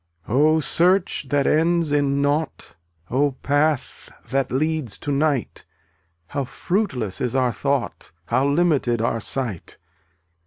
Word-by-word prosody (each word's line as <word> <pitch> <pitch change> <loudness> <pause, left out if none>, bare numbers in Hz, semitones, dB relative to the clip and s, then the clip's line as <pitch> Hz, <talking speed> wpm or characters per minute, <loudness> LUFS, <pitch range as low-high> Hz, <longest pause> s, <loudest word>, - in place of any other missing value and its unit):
284 145 +7 +3
Oh, - - +2
search 175 0 +1
that 145 -1 +1
ends 165 0 +2
in 140 -1 +1
nought; 145 - -2 0.4
Oh, 140 +2 +2
path 145 -1 0 0.2
that 135 0 0
leads 155 -2 -1
to 145 - -4
night, 140 -2 0 0.6
How 140 +10 -3
fruitless 130 - -2
is 125 0 -1
our 125 -2 +2
thought, 140 - -2
How 130 +9 +1
limited 140 -6 +2
our 115 0 0
sight. 115 -5 -3
140 Hz, 125 wpm, -22 LUFS, 130-155 Hz, 0.6 s, 284